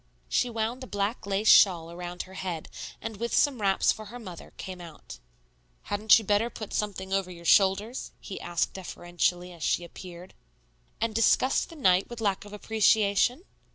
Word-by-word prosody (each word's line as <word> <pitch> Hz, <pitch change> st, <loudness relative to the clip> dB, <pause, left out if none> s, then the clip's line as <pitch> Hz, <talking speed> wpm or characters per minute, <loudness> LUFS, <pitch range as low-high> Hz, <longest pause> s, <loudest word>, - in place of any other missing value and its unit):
She 250 Hz, -, +1 dB
wound 230 Hz, +3 st, -3 dB
a -, -, -8 dB
black 205 Hz, +1 st, -2 dB
lace 200 Hz, +2 st, 0 dB
shawl 170 Hz, -6 st, +6 dB
around 175 Hz, +1 st, -6 dB
her 190 Hz, -, -15 dB
head, 180 Hz, -4 st, -5 dB, 0.3 s
and 225 Hz, -2 st, -5 dB
with 235 Hz, +3 st, -2 dB
some 275 Hz, -6 st, +2 dB
wraps 195 Hz, -1 st, +3 dB
for 215 Hz, -, -7 dB
her 235 Hz, +4 st, -9 dB
mother, 185 Hz, -8 st, -10 dB
came 185 Hz, -1 st, -7 dB
out. 160 Hz, -, -11 dB, 0.6 s
"Hadn't 210 Hz, +2 st, +4 dB
you 225 Hz, -, -3 dB
better 205 Hz, +4 st, +2 dB
put 215 Hz, -3 st, -8 dB
something 195 Hz, -2 st, -3 dB
over 195 Hz, -2 st, 0 dB
your 170 Hz, -1 st, -11 dB
shoulders?" 200 Hz, +7 st, +3 dB
he 195 Hz, -, -8 dB
asked 175 Hz, -1 st, -1 dB
deferentially 175 Hz, -1 st, -2 dB
as 170 Hz, -, -15 dB
she 175 Hz, -, +1 dB
appeared. 175 Hz, +1 st, -11 dB, 0.7 s
"And 230 Hz, 0 st, -1 dB
disgust 230 Hz, +4 st, +3 dB
the 330 Hz, -, -11 dB
night 185 Hz, -, +3 dB
with 240 Hz, -1 st, -8 dB
lack 200 Hz, -2 st, -1 dB
of 205 Hz, -, -12 dB
appreciation?" 215 Hz, -, +2 dB
200 Hz, 175 wpm, -28 LUFS, 180-220 Hz, 0.7 s, shawl